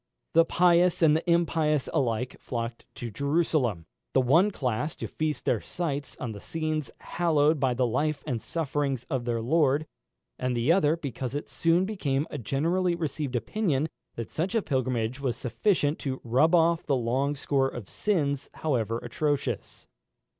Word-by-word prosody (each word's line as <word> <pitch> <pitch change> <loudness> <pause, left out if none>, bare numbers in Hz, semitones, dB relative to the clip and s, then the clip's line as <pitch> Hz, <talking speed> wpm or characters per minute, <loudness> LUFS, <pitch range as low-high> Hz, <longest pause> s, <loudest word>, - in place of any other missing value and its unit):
The 165 0 +6
pious 175 0 +4
and 155 -1 +6
the 165 +2 -1
impious 160 -4 +2
alike 125 -1 0
flocked 115 -1 -5
to 120 -4 -6
Jerusalem, 140 - 0 0.3
the - - +5
one 155 +11 +4
class 135 - -2
to - - -5
feast 155 -3 -3
their 115 - +1
sight 145 -5 -4
on 120 - -3
the 105 - -7
scenes 155 +2 -3
hallowed 155 -3 +2
by 130 -2 +1
the 125 0 +2
life 140 +4 0
and 125 -7 -2
sufferings 145 -5 -2
of 130 -3 -1
their 120 -1 -1
Lord, 145 +3 +2 0.5
and 125 -1 -1
the 120 +7 +3
other, 165 -3 +3
because 135 -4 -4
it 145 - -3
soon 170 +2 +2
became 150 -9 -1
a - - -4
generally 170 - +1
received 150 -5 -3
opinion, 155 - 0 0.3
that 115 -2 -6
such 180 +7 -2
a 225 - +2
pilgrimage 130 -3 -1
was 130 -4 -1
sufficient 150 - +1
to 130 -2 -3
rub 130 +9 +3
off 170 0 +3
the 140 - +1
long 130 +4 0
score 140 -1 +1
of 120 -7 -8
sins, 145 -9 -1
however 115 -7 0
atrocious. 140 -7 -2
145 Hz, 160 wpm, -27 LUFS, 125-165 Hz, 0.5 s, The